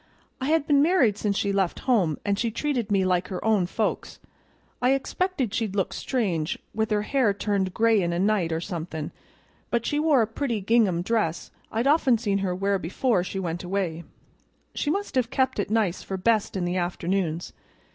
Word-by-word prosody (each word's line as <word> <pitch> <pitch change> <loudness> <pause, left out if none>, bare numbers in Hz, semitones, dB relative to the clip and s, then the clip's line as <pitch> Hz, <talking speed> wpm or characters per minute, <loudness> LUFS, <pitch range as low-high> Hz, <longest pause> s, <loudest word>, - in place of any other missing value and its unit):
I - - -1
had 315 -1 +2
been 285 -2 +4
married 300 - +4
since 200 -2 0
she 200 -1 0
left 195 -3 0
home, 190 - +2
an' 200 - +2
she 230 +3 0
treated 245 -2 -2
me 195 -2 +2
like 180 -1 +1
her 185 +1 -5
own 210 -5 +3
folks. 215 +4 -2 0.6
I 250 +2 +4
expected 275 - -2
she'd 220 -4 -1
look 195 -3 0
strange, 180 - -1 0.2
with 220 0 0
her 210 -1 +1
hair 230 -4 +1
turned 200 -2 0
gray 225 -2 +4
in 170 -1 0
a 170 - -1
night 190 -3 +1
or 160 0 -1
somethin', 160 -3 -5 0.6
but 235 -1 0
she 295 - 0
wore 300 -6 +4
a - - +1
pretty 230 +1 -2
gingham 200 -4 +2
dress 200 -6 -1 0.2
I'd 225 +3 -1
often 280 -4 +4
seen 205 -3 0
her 185 -2 -1
wear 195 +1 0
before 185 +3 0
she 190 - -5
went 175 -2 -3
away; 175 -3 -2 0.7
she 290 - -2
must 400 +6 -2
have 250 -3 +1
kept 260 -2 0
it 200 - -1
nice 210 -5 +1
for 190 - -4
best 215 0 +1
in 180 - -1
the 175 +1 -1
afternoons. 175 -1 -2
205 Hz, 195 wpm, -25 LUFS, 180-240 Hz, 0.7 s, been